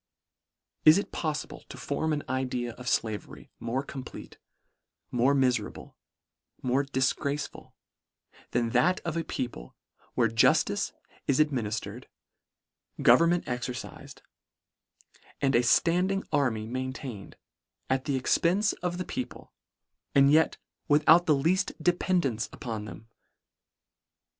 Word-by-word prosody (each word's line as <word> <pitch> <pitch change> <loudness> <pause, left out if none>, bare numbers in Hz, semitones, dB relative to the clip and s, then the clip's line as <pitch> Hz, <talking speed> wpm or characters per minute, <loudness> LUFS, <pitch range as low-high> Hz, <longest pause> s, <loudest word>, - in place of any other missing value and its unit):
Is 155 +3 +8
it 200 - -2
poffible 155 -2 -4
to - - -9
form 155 +2 -2
an 150 -1 -1
idea 125 -2 -2
of 125 +1 -5
flavery 110 -2 -3
more 120 +4 -2
complete, 135 -2 -9 0.7
more 125 +3 +3
miferable, 125 -5 0 0.7
more 130 +2 +2
dil 135 -1 -1
graceful, 140 +1 -5 0.7
than 120 -1 0
that 180 +8 +3
of 170 -1 -4
a 165 - -1
people, 120 - -5 0.4
where 115 - +3
jus 115 0 +4
tice - - -2 0.4
is 140 - +2
administered, 120 -8 -1 1.0
government 170 +8 +5
exercifed, 125 +1 -6 1.2
and 135 -1 +1
a 120 - +5
Standing 180 +10 +2
army 115 -6 +1
maintained, 130 -3 -6 0.5
at 130 0 0
the 140 -3 0
ex 130 - +2
pence 195 +6 +2
of 175 0 -2
the 185 - -3
people, 255 -1 -6 0.6
and 140 0 +6
yet 160 +2 +4 0.3
without 155 +4 +5
the 155 - +5
leaft 180 +7 +1
dependance 170 - +1
upon 110 -3 -5
them 110 +1 -10
135 Hz, 120 wpm, -28 LUFS, 120-160 Hz, 1.2 s, Is